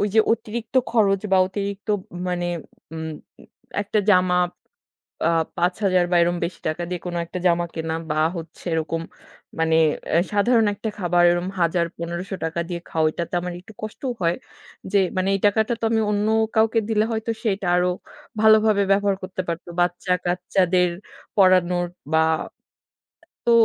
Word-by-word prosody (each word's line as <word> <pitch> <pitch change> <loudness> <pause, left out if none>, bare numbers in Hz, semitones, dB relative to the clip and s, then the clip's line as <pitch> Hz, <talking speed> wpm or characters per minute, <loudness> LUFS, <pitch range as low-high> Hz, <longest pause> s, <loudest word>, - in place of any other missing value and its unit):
যে 220 - +7
অতিরিক্ত 230 +1 -4 0.2
খরচ 200 -4 +3
বা - - +6
অতিরিক্ত 200 +2 -5
ম 205 - -1 0.3
মানে 175 -1 -1 0.5
উম 160 0 -4 0.7
একটা 205 +1 -1
জামা 180 -1 +4 0.9
আ - - +3 0.3
৫০০০ 180 +1 +2
বা 180 - +3
এরম 175 +1 +1
বেশি 170 - -5
টাকা 155 +2 -2
দিয়ে 180 -1 -4
কোনো 175 -1 -2
একটা 180 +2 -5
জামা 175 0 +3
কেনা 160 0 -3 0.2
বা 155 - +1 0.2
হচ্ছে 165 -1 -9
এরকম 160 +1 -1 0.6
মানে 160 0 +2 0.4
এ - - +6
সাধারণ 225 +2 +3
একটা 220 +2 -5
খাবার 175 -2 +2
এরকম 175 +1 -1
হাজার, 170 0 +2
১৫০০ 170 +3 -5
টাকা 165 +1 -2
দিয়ে 175 -1 -4
খাও 160 -1 0
ঐটাতে 170 +3 -4
আমার 180 0 -4
একটু 205 - -15
কষ্টও 220 +4 -4
হয়, 170 +1 +2 0.6
যে 200 - +5 0.2
মানে 185 +1 +1
এই 195 - -1
টাকাটা 220 +3 +2
তো - - -2
আমি 225 -1 +2
অন্য 205 0 +1 0.3
কাউকে 225 +1 +4
দিলে 215 -1 +2
হয়তো 220 +1 -2
সে - - -7
এইটা 195 -1 -6
আরো 180 0 +2 0.5
ভালোভাবে 215 -1 +5
ব্যবহার 200 0 +2
করতে 185 0 -4
পারতো, 170 +1 -4
বাচ্চা-কাচ্চাদের 180 0 +1 0.5
পড়ানোর 180 -2 +4 0.3
বা 160 - +4 1.3
তো - - +4
180 Hz, 155 wpm, -23 LUFS, 175-205 Hz, 1.3 s, যে